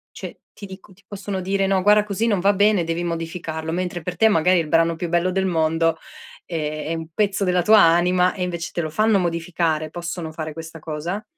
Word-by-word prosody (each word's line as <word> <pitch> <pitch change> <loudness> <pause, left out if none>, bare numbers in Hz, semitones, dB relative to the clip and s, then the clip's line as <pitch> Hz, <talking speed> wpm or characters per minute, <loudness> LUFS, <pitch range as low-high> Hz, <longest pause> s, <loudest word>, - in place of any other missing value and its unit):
Cioè, - - -9
ti - - -11
dico, 190 +1 -13
ti 195 - -26
possono 200 -1 -5
dire: 195 +1 0
"No, 190 -1 +1
guarda 210 +1 +5
così 210 +2 -2
non 205 -4 +1
va 200 +2 +3
bene, 205 -3 +3
devi 165 +1 -2
modificarlo," 165 -1 -4
mentre 180 0 -3
per 180 +2 -5
te 220 - +5
magari 180 -2 +3
è - - +2
il 155 - -9
brano 165 +1 +2
più 175 +1 -4
bello 175 +2 +1
del 190 +1 0
mondo, 165 -1 +1 0.5
ehm, 155 -3 -4
è 165 - -1
un 160 -1 -6
pezzo 200 +2 0
della 180 -1 +2
tua 215 +3 +6
anima 180 +1 +4
e 185 - -5
invece 175 -1 -4
te - - -3
lo 155 -2 -3
fanno 215 +4 +2
modificare, 170 -3 -1
possono 170 -1 -5
fare 155 0 -5
questa 165 0 -9
cosa? 165 +6 -5
175 Hz, 220 wpm, -22 LUFS, 165-195 Hz, 0.5 s, tua